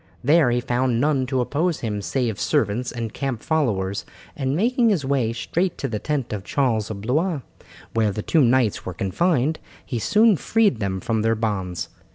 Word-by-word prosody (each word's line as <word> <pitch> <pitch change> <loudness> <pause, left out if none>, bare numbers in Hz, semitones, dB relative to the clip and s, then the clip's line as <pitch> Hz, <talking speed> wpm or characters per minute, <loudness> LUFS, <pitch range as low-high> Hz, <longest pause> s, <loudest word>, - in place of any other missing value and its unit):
There 150 0 +5
he 120 0 +1
found 125 -1 0
none 135 -2 +1
to 130 0 0
oppose 160 +7 -1
him 105 -3 -2
save 115 -2 -1
servants 115 +4 0
and 115 -2 -5
camp 135 -5 -3
followers, 105 - 0 0.3
and 135 0 -1
making 235 +5 +2
his 175 -10 +1
way 135 -5 +1
straight 170 +10 -1
to 135 - -2
the 110 -4 -3
tent 140 -5 -2
of 100 -2 -4
Charles 115 -3 0
of 100 -2 -5
Blois, 150 - 0 0.5
where 110 -2 +2
the 105 +2 -4
two 160 - +3
knights 125 -4 +2
were 95 - -6
confined, 145 - +1 0.3
he 120 - -3
soon 215 - +4
freed 210 - +2
them 95 -2 -2
from 110 +2 0
their 115 +1 +2
bonds. 95 -6 -2
125 Hz, 185 wpm, -23 LUFS, 110-150 Hz, 0.5 s, There